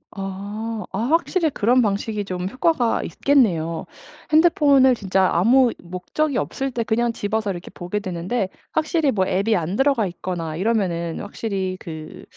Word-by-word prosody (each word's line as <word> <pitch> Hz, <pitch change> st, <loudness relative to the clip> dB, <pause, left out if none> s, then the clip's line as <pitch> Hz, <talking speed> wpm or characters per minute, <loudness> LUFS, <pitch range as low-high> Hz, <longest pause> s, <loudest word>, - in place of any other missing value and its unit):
아. 205 Hz, +3 st, -5 dB
아 195 Hz, -, -3 dB
확실히 330 Hz, -, +1 dB
그런 245 Hz, 0 st, +3 dB
방식이 210 Hz, -1 st, -1 dB
좀 185 Hz, -1 st, -4 dB
효과가 255 Hz, -1 st, +1 dB
있겠네요. 175 Hz, -, +1 dB, 0.5 s
핸드폰을 290 Hz, -5 st, +5 dB
진짜 190 Hz, -4 st, +1 dB
아무 240 Hz, +8 st, +4 dB
목적이 210 Hz, -, -2 dB
없을 270 Hz, 0 st, -2 dB
때 235 Hz, -, -1 dB
그냥 235 Hz, +1 st, +1 dB
집어서 215 Hz, 0 st, -2 dB
이렇게 175 Hz, -2 st, -6 dB
보게 180 Hz, +4 st, -4 dB
되는데 185 Hz, +3 st, -2 dB, 0.2 s
확실히 315 Hz, -2 st, +1 dB
뭐 190 Hz, -3 st, +1 dB
앱이 200 Hz, +5 st, +1 dB
안 175 Hz, +2 st, -2 dB
들어가 270 Hz, -5 st, +2 dB
있거나 170 Hz, -3 st, -4 dB
이러면은 180 Hz, -5 st, -1 dB
확실히 195 Hz, -3 st, -3 dB
그 155 Hz, -2 st, -9 dB
210 Hz, 320 characters per minute, -22 LUFS, 185-255 Hz, 0.5 s, 핸드폰을